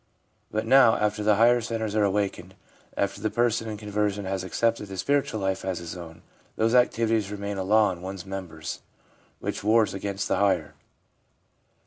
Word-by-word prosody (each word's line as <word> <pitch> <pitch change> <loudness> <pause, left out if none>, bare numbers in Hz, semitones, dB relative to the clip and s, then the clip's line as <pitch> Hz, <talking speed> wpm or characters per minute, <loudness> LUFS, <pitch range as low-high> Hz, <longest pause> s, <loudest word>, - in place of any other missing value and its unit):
But 110 +1 -2
now 125 -1 +6
after 105 0 0
the 105 0 +3
higher 120 +3 +5
centres 110 -2 -3
are 105 - +3
awakened, 95 -2 -1 0.4
after 100 - -1
the 110 - 0
person 115 0 0
in 105 - -5
conversion 105 -1 -2
has 95 0 -2
accepted 115 +3 0
the 95 -1 -8
spiritual 135 +2 0
life 95 -1 -1
as 95 -2 -2
his 85 0 -7
own, 85 -2 -10 0.3
those 115 +1 +1
activities 115 -4 +2
remain 100 -1 -4
a - - -1
law 105 +2 +4
in 90 -1 -8
one's 95 0 -6
members 95 -5 -6 0.6
which - - -4
wars 110 +1 +3
against 100 0 -3
the - - +1
higher. 100 -1 +1
105 Hz, 170 wpm, -26 LUFS, 95-110 Hz, 0.6 s, now